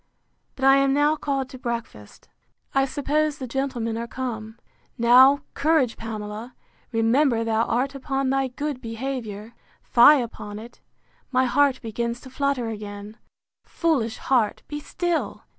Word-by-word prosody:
—But 265 - -2
I 270 0 +7
am 275 0 +3
now 295 +1 +3
called 275 -3 -2
to 260 - -10
breakfast. 230 - -6 0.5
I 270 0 +3
suppose 295 +2 0
the 265 - -5
gentlemen 240 -3 -2
are 235 - -4
come.—Now, 240 +3 +2
courage, 285 -5 +2
Pamela! 220 +1 -7 0.4
Remember 230 +1 +2
thou 225 0 +1
art 260 +4 0
upon 270 -1 -2
thy 270 0 +1
good 275 +1 -4
behaviour!—Fie 235 +2 +1
upon 210 -3 -6
it! 230 +2 -12 0.5
my 255 0 +2
heart 270 +1 +2
begins 235 +1 -3
to 260 - -12
flutter 280 -3 -1
again!—Foolish 220 +5 -4
heart! 240 -6 0
be 295 - -5
still! 345 +3 -2
255 Hz, 125 wpm, -24 LUFS, 225-275 Hz, 0.5 s, I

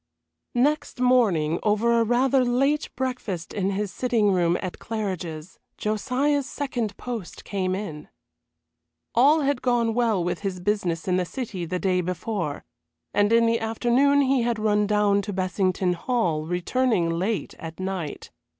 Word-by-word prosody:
XXVIII 245 - +3
Next 300 -2 0
morning, 200 -11 +3
over 230 +3 +2
a - - +4
rather 255 +3 +3
late 275 +5 +1
breakfast 250 -10 -3
in 195 -1 0
his 200 0 -2
sitting 230 -5 +2
room 175 -1 +2
at 185 -2 -6
Claridge's, 185 -7 -5 0.2
Josiah's 265 +6 0
second 245 -8 -3
post 235 -7 -6
came 185 -2 -1
in. 175 -7 -6 1.1
All 290 +7 +5
had 280 -2 0
gone 235 -2 +1
well 225 -6 +1
with 175 0 -2
his 195 -3 -3
business 180 -4 -1
in 180 -1 +2
the 180 - 0
City 195 -4 -5
the 180 +2 -2
day 180 -1 +1
before, 180 -3 -3 0.5
and 205 +1 +3
in 230 0 +5
the 230 0 +2
afternoon 245 +5 +2
he 265 -2 +2
had 235 -1 0
run 210 -1 +2
down 205 -1 +3
to 200 +1 -5
Bessington 185 0 0
Hall, 175 -7 -1
returning 180 +2 +1
late 190 +6 -2
at 165 +1 -8
night. 185 -5 -4
210 Hz, 150 wpm, -25 LUFS, 185-245 Hz, 1.1 s, All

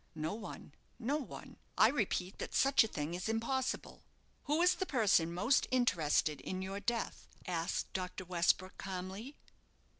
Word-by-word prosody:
"No 155 +3 -2
one 215 0 -8 0.2
no 265 +5 0
one. 295 - -8 0.2
I - - +8
repeat 195 -7 -1
that - - -4
such 275 -2 +5
a - - -1
thing 150 -4 -4
is 180 +4 -3
impossible." 240 +4 -1 0.4
"Who 300 +4 +2
is 360 - +6
the 375 - -3
person 200 - +3
most 205 +10 +2
interested 160 - +2
in 185 0 -4
your 195 +1 -4
death?" 235 +2 -2 0.2
asked 170 -2 -2
Dr. 185 0 -4
Westbrook, 180 +1 +1
calmly. 195 +8 -5
195 Hz, 150 wpm, -35 LUFS, 180-250 Hz, 0.4 s, I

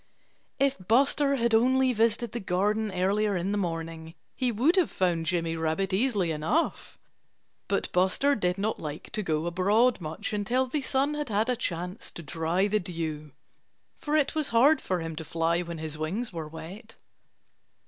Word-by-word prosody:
If 275 -3 +1
Buster 275 +4 +3
had 235 -3 +1
only 255 +3 +4
visited 230 0 +1
the 240 - -4
garden 205 +3 0
earlier 195 +2 +1
in 180 +3 -2
the 205 - 0
morning 165 -2 -4 0.2
he 255 -2 0
would 260 - +2
have 370 -3 +3
found 170 -3 0
Jimmy 165 -2 0
Rabbit 165 +4 -1
easily 200 -5 +1
enough. 160 - -1 0.7
But - - -1
Buster 190 +11 +2
did 180 -6 0
not 210 +3 -1
like 150 0 -7
to 215 - -2
go 160 -4 -1
abroad 200 +7 +2
much 155 +5 -4
until 235 +6 +1
the 280 +3 -2
sun 275 +2 0
had 295 -3 -3
had 215 +3 +1
a 250 - +2
chance 180 -1 -4
to 170 - -8
dry 165 +5 0
the 210 +1 +1
dew, 160 -5 -5 0.7
for 300 -1 -1
it 285 -3 +1
was 305 -3 -1
hard 270 +7 +5
for 185 -2 -2
him 165 -1 -5
to 160 - -4
fly 165 +2 0
when 170 -1 -6
his 155 -1 -6
wings 190 +9 -3
were 160 -2 -5
wet. 185 +8 -10
195 Hz, 175 wpm, -28 LUFS, 165-245 Hz, 0.7 s, hard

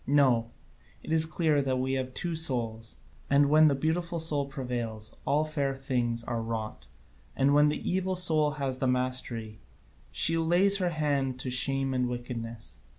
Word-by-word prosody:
No, 130 -5 +3 0.5
it - - -7
is 160 0 +3
clear 155 -2 +1
that 130 -2 -1
we 130 +1 -1
have 130 -1 -3
two 175 -1 -3
souls, 115 -8 -2 0.3
and 140 +1 +4
when 155 +1 +6
the 140 - +2
beautiful 170 +4 -1
soul 150 -3 +1
prevails, 120 -5 -5
all 150 +2 +2
fair 140 -3 -2
things 120 -4 -2
are 115 -1 -3
wrought, 110 - -5 0.5
and 135 +1 +2
when 150 +1 +5
the 150 - -4
evil 185 +1 0
soul 160 -4 +2
has 135 -2 -2
the 130 - 0
mastery, 125 -4 -1 0.5
she 165 +1 +2
lays 180 +5 +3
her 180 -2 +1
hand 140 -5 -1
to 130 - -4
shame 135 +1 +2
and 125 -1 0
wickedness. 115 -3 -6
135 Hz, 165 wpm, -28 LUFS, 125-155 Hz, 0.5 s, when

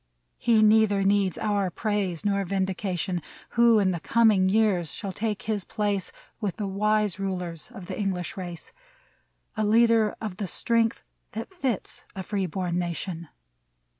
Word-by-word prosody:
He 225 -2 +4
neither 215 -2 +4
needs 195 -2 +2
our 205 -3 0
praise 200 -3 -2
nor 200 -1 +2
vindication, 190 -1 -2 0.3
Who 235 -1 +5
in 195 -3 +3
the 175 - -2
coming 210 -2 +4
years 195 -7 +2
shall 200 -3 -5
take 210 +1 -3
his 215 -3 -1
place 205 -2 -2 0.3
With 205 -5 -2
the 210 - -3
wise 210 0 +1
rulers 180 -4 -4
of 215 -7 -10
the - - -6
English 185 -4 -2
race; 175 -3 -7 0.8
A 215 - 0
leader 225 0 +4
of 210 -5 -5
the 200 - -3
strength 230 +4 +1 0.3
that 225 - -6
fits 265 - -3
a 190 - -4
free 195 0 -1
born 180 0 -2
na 175 -1 -1
tion 170 -1 -5
200 Hz, 155 wpm, -26 LUFS, 185-215 Hz, 0.8 s, Who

